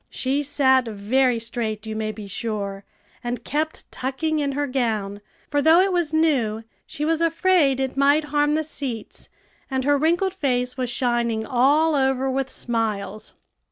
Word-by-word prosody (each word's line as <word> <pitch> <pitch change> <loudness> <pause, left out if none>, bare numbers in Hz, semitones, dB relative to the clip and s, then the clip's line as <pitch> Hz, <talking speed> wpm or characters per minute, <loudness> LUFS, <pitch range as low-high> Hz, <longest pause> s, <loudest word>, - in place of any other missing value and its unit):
She 270 +2 -1
sat 265 -3 +3
very 235 +4 +1
straight, 225 -2 -4
you 220 0 -5
may 215 0 -2
be 215 -1 -9
sure, 200 -2 -4 0.4
and 240 0 -4
kept 310 +2 -3
tucking 305 +5 -2
in 280 -1 -1
her 290 +1 -1
gown; 220 -7 -2 0.3
for 290 -1 +2
though 320 +3 +6
it 380 0 +3
was 345 -4 0
new, 265 -9 +1 0.2
she 300 - -4
was 325 +1 +1
afraid 330 -4 +3
it 265 -1 -2
might 285 +3 +4
harm 295 0 +3
the 315 +1 +1
seats, 265 -7 -6 0.4
and 265 -1 -1
her 285 +1 +3
wrinkled 345 +5 +1
face 250 -8 -1
was 255 -2 -2
shining 235 -3 0
all 285 +7 +3
over 265 -1 +1
with 270 0 -1
smiles. 215 -5 -3
265 Hz, 160 wpm, -23 LUFS, 230-295 Hz, 0.4 s, though